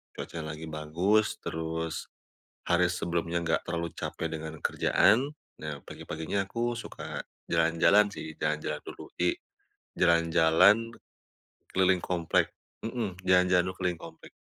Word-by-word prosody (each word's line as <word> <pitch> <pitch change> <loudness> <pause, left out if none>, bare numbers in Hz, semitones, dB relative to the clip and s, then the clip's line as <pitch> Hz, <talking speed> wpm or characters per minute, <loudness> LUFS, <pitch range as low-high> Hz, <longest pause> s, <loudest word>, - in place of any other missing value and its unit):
cuacanya 80 -2 -6
lagi 80 +1 -8
bagus 85 +8 +1
terus 80 0 -3 0.6
hari 85 +1 +4
sebelumnya 85 -1 -1
nggak 80 -1 +1
terlalu 85 -1 -2
capek - - -3
dengan 80 0 -6
kerjaan. 135 +7 +3 0.3
Nah 75 -2 -5
pagi-paginya 80 +6 -3
aku 120 +4 -2
suka - - -7 0.3
jalan-jalan 85 +5 +4
sih, 80 -6 -7
jalan-jalan 75 0 -2
dulu. - - -9
Jadi 90 0 +1 0.6
jalan-jalan 85 +6 +4 0.8
keliling 95 -1 +3
komplek 85 -3 +1 0.3
mhm, 110 -6 -4
jalan-jalan 90 -1 +5
dulu 95 - -4
keliling 90 -3 -1
komplek. 80 -1 -11
85 Hz, 115 wpm, -29 LUFS, 80-95 Hz, 0.8 s, jalan-jalan